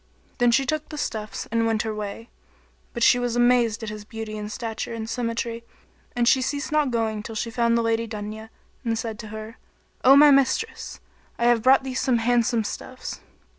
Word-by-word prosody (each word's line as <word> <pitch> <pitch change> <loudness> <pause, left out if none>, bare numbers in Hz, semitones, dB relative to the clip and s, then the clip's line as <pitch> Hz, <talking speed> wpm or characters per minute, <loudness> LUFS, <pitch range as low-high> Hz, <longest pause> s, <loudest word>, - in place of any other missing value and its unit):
Then 245 0 +4
she 255 +3 +3
took 310 +3 -2
the 305 - -7
stuffs 215 -7 -4
and 230 0 +2
went 220 -1 +1
her 220 -1 -3
way; 210 +2 -6 0.6
but 235 - -2
she 245 - +6
was 245 -1 -1
amazed 240 -2 +3
at 220 - -4
his 210 0 -7
beauty 220 0 -7
and 210 0 -5
stature 230 +1 -4
and 220 -1 -5
symmetry, 230 0 -3 0.5
and 240 -1 +1
she 260 - +5
ceased 285 +4 -2
not 300 -2 +2
going 225 -3 -1
till 225 +1 -8
she 230 +2 -3
found 235 0 +2
the 230 - +1
Lady 230 0 0
Dunya 215 0 -7 0.3
and 230 -2 -1
said 225 -1 -4
to 220 - -7
her, 220 +2 -8 0.5
"O 265 +2 +8
my 295 +1 +8
mistress! 275 - +1 0.4
I - - -2
have 240 -1 +4
brought 265 +3 +5
thee 265 -1 -5
some 255 -1 +1
handsome 235 0 +2
stuffs." 205 - -6
230 Hz, 200 wpm, -24 LUFS, 220-245 Hz, 0.6 s, O